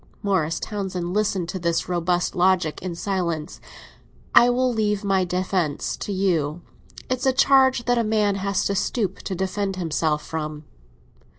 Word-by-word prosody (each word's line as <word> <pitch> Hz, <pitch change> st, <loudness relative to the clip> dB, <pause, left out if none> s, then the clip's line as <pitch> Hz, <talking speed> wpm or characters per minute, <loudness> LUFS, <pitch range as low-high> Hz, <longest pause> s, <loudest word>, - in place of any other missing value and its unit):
Morris 185 Hz, -6 st, 0 dB
Townsend 185 Hz, -4 st, -4 dB
listened 200 Hz, -4 st, 0 dB
to 185 Hz, -, -4 dB
this 170 Hz, -1 st, 0 dB
robust 175 Hz, 0 st, 0 dB
logic 180 Hz, -3 st, +2 dB
in 180 Hz, -2 st, -4 dB
silence. 170 Hz, -4 st, -3 dB, 0.7 s
"I 240 Hz, -, +7 dB
will 250 Hz, 0 st, +1 dB
leave 210 Hz, -2 st, 0 dB
my 195 Hz, -2 st, +2 dB
defence 180 Hz, -4 st, -1 dB
to -, -, -5 dB
you; 175 Hz, -5 st, 0 dB, 0.4 s
it's 255 Hz, +1 st, -1 dB
a -, -, +5 dB
charge 265 Hz, -2 st, +4 dB
that 245 Hz, -1 st, +2 dB
a -, -, +2 dB
man 210 Hz, -2 st, +1 dB
has 200 Hz, 0 st, -1 dB
to 200 Hz, -, +1 dB
stoop 200 Hz, 0 st, -1 dB
to 190 Hz, -, -4 dB
defend 190 Hz, +1 st, -2 dB
himself 160 Hz, -3 st, -1 dB
from." 155 Hz, -1 st, -5 dB
190 Hz, 155 wpm, -23 LUFS, 170-210 Hz, 0.7 s, I